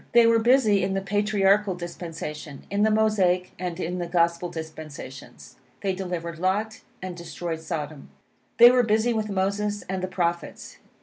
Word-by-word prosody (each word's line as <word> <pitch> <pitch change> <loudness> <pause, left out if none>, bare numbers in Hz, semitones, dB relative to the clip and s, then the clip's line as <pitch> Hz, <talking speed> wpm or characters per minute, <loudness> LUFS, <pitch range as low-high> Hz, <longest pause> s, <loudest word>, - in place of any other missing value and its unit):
They 235 -1 +7
were 230 0 +5
busy 225 -4 +4
in 190 +1 -1
the 195 - 0
Patriarchal 205 0 +2
dispensation, 165 -4 -7
in 200 +1 0
the 215 - +4
Mosaic, 200 -5 +2
and 180 -2 -4
in 180 +2 -3
the 175 - -3
Gospel 170 0 +1
dispensations. 155 -5 -9 0.2
They 195 -1 0
delivered 175 -3 -5
Lot 205 +5 -1 0.2
and 185 -1 -5
destroyed 170 -1 -5
Sodom. 155 -3 -5 0.5
They 240 +1 +10
were 250 0 +4
busy 225 +1 +2
with 215 -1 -2
Moses 200 +2 -1
and 190 0 -4
the 185 - -2
Prophets. 175 -2 -3
185 Hz, 160 wpm, -25 LUFS, 170-210 Hz, 0.5 s, They